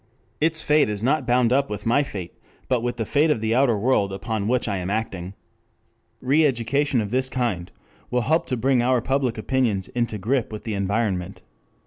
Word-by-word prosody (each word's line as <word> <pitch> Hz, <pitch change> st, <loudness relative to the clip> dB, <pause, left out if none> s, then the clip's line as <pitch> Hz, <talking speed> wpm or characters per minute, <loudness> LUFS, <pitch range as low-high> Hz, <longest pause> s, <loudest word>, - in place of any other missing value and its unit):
Its 160 Hz, +1 st, +1 dB
fate 150 Hz, -4 st, +3 dB
is 105 Hz, 0 st, -4 dB
not 135 Hz, +1 st, +1 dB
bound 125 Hz, -1 st, +3 dB
up 140 Hz, +1 st, +2 dB
with 105 Hz, -1 st, -5 dB
my 120 Hz, +5 st, +3 dB
fate, 95 Hz, -11 st, -6 dB, 0.3 s
but 125 Hz, -3 st, +1 dB
with 120 Hz, 0 st, -2 dB
the 115 Hz, -, -2 dB
fate 150 Hz, +6 st, +2 dB
of 150 Hz, -, +2 dB
the 110 Hz, +1 st, 0 dB
outer 125 Hz, -3 st, +3 dB
world 100 Hz, -3 st, +1 dB
upon 100 Hz, +2 st, -3 dB
which 125 Hz, +1 st, +1 dB
I 100 Hz, -2 st, -1 dB
am 90 Hz, +1 st, -4 dB
acting. 100 Hz, -3 st, -3 dB, 0.9 s
5 -, -, -10 dB
Re 155 Hz, +3 st, +5 dB
education 135 Hz, +1 st, 0 dB
of 105 Hz, -1 st, -5 dB
this 130 Hz, +1 st, +1 dB
kind 115 Hz, -10 st, -2 dB, 0.4 s
will 125 Hz, 0 st, +1 dB
help 160 Hz, +7 st, +1 dB
to 125 Hz, -, -1 dB
bring 130 Hz, +1 st, +2 dB
our 125 Hz, +1 st, +2 dB
public 130 Hz, -1 st, -1 dB
opinions 110 Hz, -4 st, 0 dB
into 120 Hz, -3 st, -2 dB
grip 115 Hz, +5 st, -1 dB
with 105 Hz, -, -7 dB
the 110 Hz, -, -3 dB
environment. 100 Hz, -2 st, -2 dB
120 Hz, 200 wpm, -23 LUFS, 105-130 Hz, 0.9 s, Re